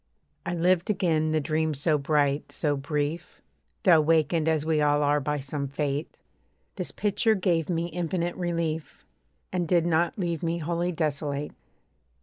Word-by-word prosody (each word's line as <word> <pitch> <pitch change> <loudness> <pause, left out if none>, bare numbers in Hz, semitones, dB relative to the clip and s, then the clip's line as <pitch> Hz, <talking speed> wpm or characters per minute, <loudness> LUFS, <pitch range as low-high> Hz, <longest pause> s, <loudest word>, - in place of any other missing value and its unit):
I 175 - -1
lived 175 +2 +2
again 160 -6 +1
the 155 - +2
dream 155 +1 0
so 150 +2 +1
bright, 145 0 +1
so 145 -2 0
brief, 150 +4 -3 0.4
Though 170 -6 +6
wakened 160 +1 +2
as 155 -2 +1
we 160 -1 +2
all 145 0 +3
are 145 +1 +3
by 150 +1 -2
some 140 +1 -4
Fate; 140 +2 -3 0.6
This 180 -3 -4
picture 215 +2 +1
gave 175 -4 0
me 170 -1 0
infinite 175 0 -2
relief, 170 -3 -3 0.5
And 175 -2 0
did 170 -1 +3
not 170 0 +1
leave 170 -5 -2
me 170 0 -1
wholly 170 +2 -1
desolate. 150 -3 -2
160 Hz, 150 wpm, -27 LUFS, 150-175 Hz, 0.6 s, Though